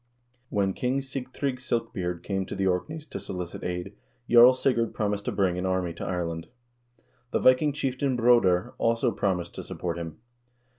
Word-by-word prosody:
When 100 -2 +1
King 130 +5 0
Sigtrygg 135 0 -4
Silkbeard 115 -9 -2
came 95 -2 -2
to - - -5
the 95 - 0
Orkneys 150 - -1
to 140 - -6
solicit 90 -2 -6
aid, 90 +2 -4 0.3
Jarl 120 +2 +8
Sigurd 120 -3 +1
promised 100 -1 -1
to - - 0
bring 90 -3 +1
an 90 - -2
army 95 -2 0
to 85 - -7
Ireland. 85 -2 -3 0.8
The - - +1
Viking 130 +4 +4
chieftain 135 -1 -1
Broder 115 -7 +4
also 115 +2 +2
promised 90 -4 -1
to - - -6
support 85 -1 -4
him. 80 -2 -6
100 Hz, 160 wpm, -27 LUFS, 90-125 Hz, 0.8 s, Jarl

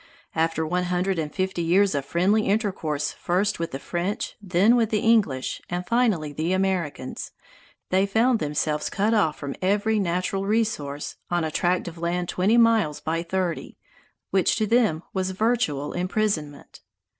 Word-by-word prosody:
After 160 0 0
one 180 +3 0
hundred 180 0 0
and 150 -2 -3
fifty 185 0 -2
years 185 +3 +3
of 140 -2 -2
friendly 195 +8 +2
intercourse 185 -9 -1
first 190 +3 -1
with 165 - -2
the 135 - -5
French, 175 +7 -3
then 195 +4 +3
the 225 -3 +2
English, 205 - +1
and 175 +1 -3
finally 205 -11 +1
the 160 +5 -1
Americans, 185 -9 -2 0.6
they 190 +2 +3
found 225 +4 +2
themselves 150 0 -1
cut 210 +3 +1
off 190 -9 +2
from 140 -1 -5
every 205 +3 +2
natural 185 +1 -1
resource, 200 -10 -1
on 175 -1 0
a 160 - -2
tract 180 +3 0
of 170 -1 -8
land 175 +1 -1
twenty 200 +6 +2
miles 225 -10 +3
by 165 +1 -2
thirty, 175 0 -3 0.5
which 190 -2 +3
to 215 - +1
them 215 -8 +2
was 190 -1 -1
virtual 190 - 0
imprisonment. 180 -5 -2
180 Hz, 155 wpm, -25 LUFS, 160-205 Hz, 0.6 s, years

